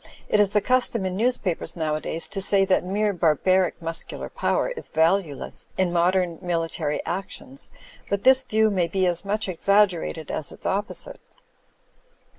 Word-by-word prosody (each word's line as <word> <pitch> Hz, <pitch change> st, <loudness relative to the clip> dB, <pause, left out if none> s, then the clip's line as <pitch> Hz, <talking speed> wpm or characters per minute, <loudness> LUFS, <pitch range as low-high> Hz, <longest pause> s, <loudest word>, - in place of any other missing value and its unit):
It 210 Hz, -, +2 dB
is 205 Hz, -1 st, +4 dB
the 210 Hz, +1 st, +1 dB
custom 245 Hz, -3 st, +2 dB
in 185 Hz, -1 st, -2 dB
newspapers 200 Hz, -7 st, -1 dB
nowadays 160 Hz, 0 st, -2 dB
to 200 Hz, -1 st, -3 dB
say 195 Hz, 0 st, +5 dB
that 190 Hz, -, +2 dB
mere 205 Hz, +3 st, 0 dB
bar 165 Hz, -4 st, +2 dB
baric 185 Hz, +2 st, +1 dB
muscular 165 Hz, 0 st, -3 dB
power -, -, 0 dB
is -, -, -7 dB
valueless 160 Hz, -2 st, 0 dB
in 185 Hz, -2 st, +1 dB
modem 175 Hz, 0 st, +1 dB
military 165 Hz, -4 st, -2 dB
actions, 175 Hz, -7 st, -5 dB, 0.4 s
but 200 Hz, -1 st, -1 dB
this 260 Hz, 0 st, +6 dB
view 220 Hz, -4 st, +2 dB
may 180 Hz, -4 st, +1 dB
be 190 Hz, +1 st, 0 dB
as 175 Hz, 0 st, 0 dB
much 210 Hz, +2 st, 0 dB
exaggerated 185 Hz, -4 st, +1 dB
as 150 Hz, -, -3 dB
its -, -, -13 dB
opposite. 205 Hz, -, -3 dB
185 Hz, 155 wpm, -24 LUFS, 165-205 Hz, 0.4 s, this